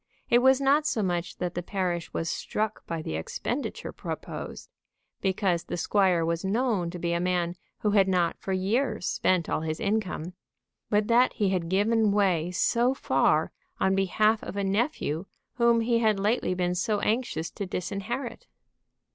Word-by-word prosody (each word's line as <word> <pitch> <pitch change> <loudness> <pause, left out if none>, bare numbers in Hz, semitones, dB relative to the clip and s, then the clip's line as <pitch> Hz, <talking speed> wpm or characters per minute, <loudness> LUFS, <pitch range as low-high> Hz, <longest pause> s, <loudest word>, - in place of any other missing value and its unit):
It 240 - +7
was 265 +1 +5
not 285 +3 +3
so 220 - 0
much 175 -2 -2
that 180 -1 -3
the 175 - -3
parish 175 -2 -2
was 165 - -2
struck 215 +5 -2
by 165 -1 -3
the - - -4
expenditure 80 +1 -4
proposed, - - -7 0.5
because 190 -3 +1
the - - -4
squire 180 -2 +2
was 165 0 -1
known 205 -3 0
to 180 - -6
be 170 0 -1
a 170 - +1
man 175 -1 0 0.3
who 210 - +2
had 200 -2 +4
not 180 -3 +1
for 195 - -5
years 210 +3 0
spent 180 -3 +1
all - - -1
his 155 0 -3
income, 200 -5 -2 0.6
but 210 0 +2
that 240 +2 +4
he 205 -2 +1
had 180 -3 -1
given 210 +3 +3
way 185 -5 +2
so 240 +8 +2
far - - +2 0.3
on 190 - +2
behalf 215 +3 +2
of - - -6
a 200 - 0
nephew 195 - -1 0.3
whom 235 -1 +4
he 230 0 +2
had 215 -3 +2
lately 205 -2 +1
been 180 -1 0
so 205 +4 0
anxious 220 -7 -1
to 200 - -5
disinherit. 230 - -4
195 Hz, 170 wpm, -27 LUFS, 175-225 Hz, 0.6 s, It